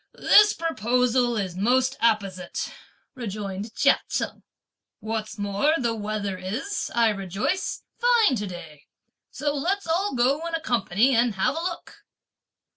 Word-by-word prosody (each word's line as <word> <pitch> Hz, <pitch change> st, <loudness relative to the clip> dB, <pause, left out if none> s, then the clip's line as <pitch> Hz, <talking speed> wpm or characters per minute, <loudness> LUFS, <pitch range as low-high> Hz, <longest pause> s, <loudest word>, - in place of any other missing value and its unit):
"This 420 Hz, 0 st, +6 dB
proposal 250 Hz, -5 st, +1 dB
is 190 Hz, -4 st, -3 dB
most 255 Hz, +7 st, +2 dB
apposite," 195 Hz, -6 st, -1 dB, 0.4 s
rejoined 210 Hz, -3 st, -5 dB
Chia -, -, +4 dB
Cheng. -, -, -3 dB, 0.6 s
"What's 220 Hz, 0 st, -4 dB
more, 205 Hz, +10 st, +1 dB
the 235 Hz, -5 st, 0 dB
weather 205 Hz, -3 st, -3 dB
is, 230 Hz, -, -3 dB
I 230 Hz, -1 st, +4 dB
rejoice, 195 Hz, -, -2 dB, 0.2 s
fine 475 Hz, -, +4 dB
to 205 Hz, -1 st, -3 dB
day; 165 Hz, -5 st, -10 dB, 0.4 s
so 290 Hz, -1 st, -2 dB
let's 370 Hz, +8 st, -1 dB
all 335 Hz, 0 st, 0 dB
go 265 Hz, +6 st, +2 dB
in 335 Hz, -, -2 dB
a -, -, -1 dB
company 240 Hz, -, +1 dB
and 235 Hz, -2 st, +2 dB
have 190 Hz, -, +1 dB
a 325 Hz, -, -2 dB
look." 350 Hz, 0 st, -6 dB
235 Hz, 135 wpm, -25 LUFS, 200-290 Hz, 0.6 s, This